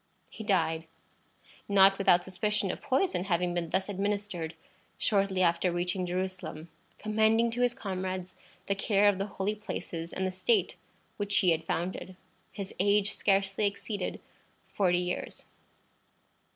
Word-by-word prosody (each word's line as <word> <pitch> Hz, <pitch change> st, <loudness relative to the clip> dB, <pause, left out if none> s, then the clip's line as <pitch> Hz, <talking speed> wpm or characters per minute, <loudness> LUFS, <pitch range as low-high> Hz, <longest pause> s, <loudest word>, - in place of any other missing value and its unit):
He 220 Hz, -, -8 dB
died, 165 Hz, -6 st, +1 dB, 0.8 s
not 195 Hz, 0 st, +6 dB
without 175 Hz, -3 st, +5 dB
suspicion 195 Hz, +1 st, -1 dB
of -, -, -7 dB
poison 285 Hz, -, +1 dB
having 175 Hz, -2 st, +1 dB
been 170 Hz, -1 st, -2 dB
thus 190 Hz, +3 st, 0 dB
administered, 200 Hz, -4 st, -2 dB, 0.4 s
shortly 195 Hz, -3 st, +2 dB
after 170 Hz, +1 st, +2 dB
reaching 180 Hz, +1 st, -1 dB
Jerusalem, 180 Hz, -3 st, -4 dB, 0.3 s
commending 220 Hz, +2 st, +2 dB
to 245 Hz, +2 st, -2 dB
his 245 Hz, -1 st, +2 dB
comrades 185 Hz, -4 st, -4 dB, 0.3 s
the 200 Hz, -, +1 dB
care 200 Hz, +1 st, +3 dB
of 195 Hz, -2 st, 0 dB
the 195 Hz, -, -1 dB
holy 200 Hz, +1 st, -2 dB
places, 170 Hz, -5 st, -5 dB
and 190 Hz, -, -2 dB
the 185 Hz, -, -1 dB
state 410 Hz, -, +1 dB, 0.4 s
which 205 Hz, -1 st, +1 dB
he 185 Hz, -4 st, +4 dB
had 165 Hz, 0 st, 0 dB
founded. 185 Hz, +2 st, -3 dB, 0.4 s
His 195 Hz, -1 st, -6 dB
age 205 Hz, +1 st, +3 dB
scarcely 195 Hz, +1 st, +1 dB
exceeded 200 Hz, -1 st, -4 dB, 0.5 s
forty 180 Hz, -3 st, +3 dB
years. 180 Hz, 0 st, -3 dB
195 Hz, 140 wpm, -30 LUFS, 180-205 Hz, 0.8 s, not